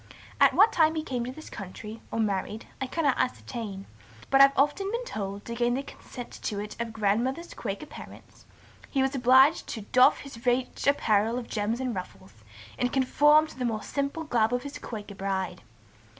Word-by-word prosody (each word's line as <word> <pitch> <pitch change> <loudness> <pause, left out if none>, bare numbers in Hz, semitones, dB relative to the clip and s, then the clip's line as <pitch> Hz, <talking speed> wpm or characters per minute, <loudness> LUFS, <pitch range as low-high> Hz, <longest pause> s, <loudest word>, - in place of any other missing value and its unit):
At - - +6
what 430 +3 +6
time 320 -1 +4
he 315 - -2
came 250 -5 -3
to 250 - -4
this 310 +4 -11
country, 210 +2 -8
or - - -3
married, 210 0 -1 0.2
I 265 - -1
cannot 285 -1 0
ascertain, 220 -6 -3 0.5
but 270 0 +6
have 275 0 +8
often 295 +8 +2
been 475 +2 -3
told, 200 - -5
to 235 - -5
gain 240 +1 +1
the 270 - -2
consent 245 -3 -10
to 205 - -3
it 210 +1 -6
of 235 -1 -3
grandmother's 230 +10 -1
Quaker 205 +6 -5
parents, - - -13 0.4
he 270 -2 +1
was 265 +1 0
obliged 265 +4 +5
to 220 - -5
doff 250 +5 +4
his 265 -4 -11
rich 250 +1 0
apparel 225 -4 +2
of 250 - -5
gems 215 +2 -1
and 255 -2 -2
ruffles, 185 -2 -8 0.5
and 250 0 +1
conform 295 +3 +4
to 285 - -13
the - - -1
more 225 -3 -1
simple 280 +3 -2
garb 235 -7 +1
of 245 - -3
his 285 0 -7
Quaker 210 -3 -7
bride. 195 -2 -3
245 Hz, 190 wpm, -27 LUFS, 215-275 Hz, 0.5 s, have